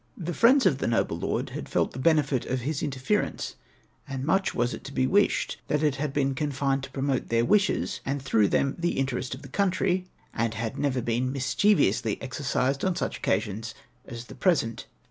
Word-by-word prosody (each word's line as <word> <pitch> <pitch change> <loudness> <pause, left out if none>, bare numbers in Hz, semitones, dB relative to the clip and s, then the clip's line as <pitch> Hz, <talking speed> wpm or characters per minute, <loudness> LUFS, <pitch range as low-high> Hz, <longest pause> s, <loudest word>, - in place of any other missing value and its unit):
The 175 -1 -4
friends 255 +5 +5
of 145 -8 +3
the - - -1
noble 115 - 0
lord - - -2
had - - -6
felt - - +1
the 130 - -8
benefit 145 -4 +2
of 130 0 -1
his 145 +3 -2
inter 135 -3 -3
ference, 210 +11 -1 0.5
and 135 -1 -4
much 190 +5 +1
was 120 +1 +1
it - - -8
to 135 - -7
be 130 - +1
wished 205 +9 +2
that 150 +1 0
it 145 -3 +2
had 145 0 -2
been 135 -1 +1
con 145 +2 -1
fined 135 0 0
to 135 - -7
promote 135 0 -1
their 115 0 +2
wishes, 205 +7 +1
and 140 +1 -2
through 115 -6 +2
them 140 +6 +1
the 175 0 0
interest 130 -1 -1
of 140 - -13
the - - -9
country, 185 +2 0 0.3
and 115 -1 -1
had 110 0 -3
never 130 -4 0
been 120 +2 0
mischievously 135 - +2
exercised 135 0 -1
on 185 -2 +1
such - - -2
occasions 105 +3 -2 0.3
as 120 -2 -8
the - - -11
present. 145 - 0
135 Hz, 205 wpm, -27 LUFS, 125-155 Hz, 0.5 s, friends